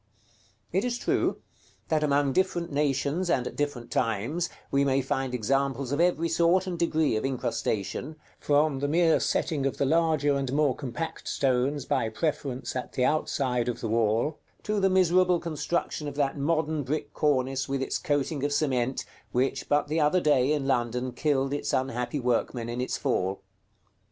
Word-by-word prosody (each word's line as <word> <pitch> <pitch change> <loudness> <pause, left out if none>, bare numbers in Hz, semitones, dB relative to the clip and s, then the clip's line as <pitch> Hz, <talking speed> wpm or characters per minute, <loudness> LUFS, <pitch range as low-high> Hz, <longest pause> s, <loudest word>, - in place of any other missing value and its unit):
It 190 +4 +1
is 245 -1 -1
true, - - 0 0.5
that 155 -1 +2
among 140 -2 +2
different 175 -2 0
nations, 145 +4 0
and 130 -7 +1
at - - -5
different 145 -5 -3
times, 120 - 0 0.2
we 140 0 +3
may 135 -1 +2
find 135 0 -1
examples 135 +2 0
of 145 +3 +1
every 170 -1 +2
sort 170 +3 +3
and 185 -2 -3
degree 160 -6 +2
of 110 - -1
incrustation, 130 +1 -2 0.2
from 145 -1 +2
the 145 - 0
mere 165 +2 +3
setting 150 -4 0
of 135 - -3
the 140 - +1
larger 155 -1 +2
and 135 -2 -2
more 145 -3 +2
compact 140 +4 -5
stones 135 +1 0
by 130 -6 0
preference 130 +1 -3
at 125 - -4
the 125 - +1
outside 130 -5 0
of 120 - -3
the - - -3
wall, 115 +6 +1 0.2
to 210 0 0
the 195 0 +3
miserable 185 -1 +4
construction 165 -1 -2
of 145 - -5
that 140 -2 0
modern 155 +1 0
brick 145 +3 -3
cornice, 135 -2 0
with 135 -1 -1
its - - -2
coating 145 0 -1
of 145 - 0
cement, 130 -3 0 0.3
which, 135 +2 -1
but 145 0 +2
the 155 +2 0
other 150 +4 +3
day, 145 -4 +3
in 145 -3 0
London, 125 -1 0
killed 135 +1 0
its 145 - -2
unhappy 125 +1 -1
workmen 120 -1 -1
in 120 +1 -3
its 130 - -2
fall. 95 +1 -1
140 Hz, 170 wpm, -27 LUFS, 130-155 Hz, 0.5 s, miserable